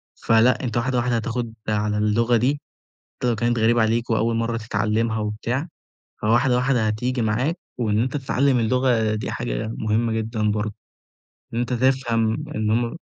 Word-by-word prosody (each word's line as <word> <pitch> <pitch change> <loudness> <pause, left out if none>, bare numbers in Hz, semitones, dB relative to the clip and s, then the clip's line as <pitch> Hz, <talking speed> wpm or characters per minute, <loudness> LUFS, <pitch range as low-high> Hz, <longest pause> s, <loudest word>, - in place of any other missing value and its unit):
فلأ 115 +3 +3
أنت 120 -3 -2
واحدة، 125 +2 0
واحدة 120 0 +1
هتاخد 115 +1 -2 0.2
على 105 0 0
اللغة 115 +3 +2
دي، 135 +5 0 0.6
حتى 125 - -1
لو 120 - +2
كانت 120 +2 0
غريبة 115 +1 +3
عليك 115 +2 0
وأول 115 +1 +1
مرّة 115 0 -1
تتعلمها 110 +1 0
وبتاع 115 +8 -2 0.5
فواحدة 120 +3 +3
واحدة 125 -3 +2
هتيجي 120 +4 -1
معاك، 125 +10 0 0.2
وإن 105 -3 +1
أنت 130 +4 -2
تتعلم 135 -1 +1
اللغة 115 -2 +2
دي 110 - -3
حاجة - - -3
مهمة 110 +2 0
جدًا 110 -1 -1
برضه، 105 0 -2 0.8
إن - - -1
أنت 120 +1 -1
تفهم 120 -3 +1 0.2
إن 110 0 0
هُم 115 +3 0
115 Hz, 160 wpm, -23 LUFS, 110-125 Hz, 0.8 s, فلأ